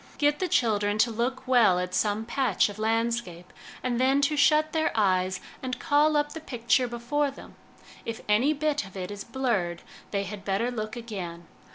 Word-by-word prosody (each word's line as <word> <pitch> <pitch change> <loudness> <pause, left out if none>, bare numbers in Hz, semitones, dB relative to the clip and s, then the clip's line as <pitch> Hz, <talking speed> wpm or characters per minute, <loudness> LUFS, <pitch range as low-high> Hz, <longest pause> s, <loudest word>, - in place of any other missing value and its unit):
Get 295 0 +2
the 370 - 0
children 210 -8 +1
to 230 +2 +3
look 250 +4 -2
well 235 -8 +5
at 180 0 -3
some 210 +3 0
patch 235 -5 +1
of 205 +1 -9
landscape, 225 -5 -1 0.3
and 245 -1 -1
then 265 +2 +3
to 285 +2 +2
shut 305 +1 +3
their 315 -1 +1
eyes 185 -3 +2 0.2
and 255 -1 -3
call 295 +3 +3
up 295 0 0
the 320 - -6
picture 245 -3 +1
before 245 +5 -1
them; 275 - -12 0.5
if 230 -1 -5
any 220 +8 +3
bit 300 -1 0
of 195 0 -11
it 185 +1 -5
is 205 -1 -6
blurred, 215 -9 -1 0.3
they 200 -1 -1
had 200 0 -7
better 200 +5 0
look 215 -2 -4
again. 185 -8 -6
230 Hz, 185 wpm, -27 LUFS, 205-270 Hz, 0.5 s, well